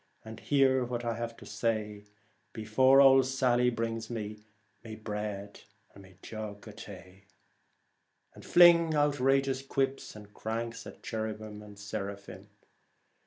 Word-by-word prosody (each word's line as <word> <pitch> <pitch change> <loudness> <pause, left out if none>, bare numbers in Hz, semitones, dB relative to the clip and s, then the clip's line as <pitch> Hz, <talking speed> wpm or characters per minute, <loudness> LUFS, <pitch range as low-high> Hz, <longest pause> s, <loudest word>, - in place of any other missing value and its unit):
And 110 0 -9
hear 135 -2 +2
what 120 -1 -4
I 115 - 0
have 115 0 -5
to - - -13
say 105 -3 -3 0.5
Before 130 +5 +4
ould 135 -1 +7
Salley 125 -2 +2
brings 115 -1 -3
me 105 -2 -5 0.4
My 110 -2 -8
bread 105 -2 -6 0.3
and 100 -1 -14 0.2
jug 110 -1 -8
of 105 - -11
tay; 95 -2 -12 1.1
and - - -14
fling 170 -2 +6
outrageous 135 -2 +2
quips 135 -2 -2
and 105 -1 -13
cranks 115 +1 -5
at - - -13
cherubim 110 -1 -5
and 105 -1 -13
seraphim. 100 -1 -7
115 Hz, 125 wpm, -30 LUFS, 105-130 Hz, 1.1 s, ould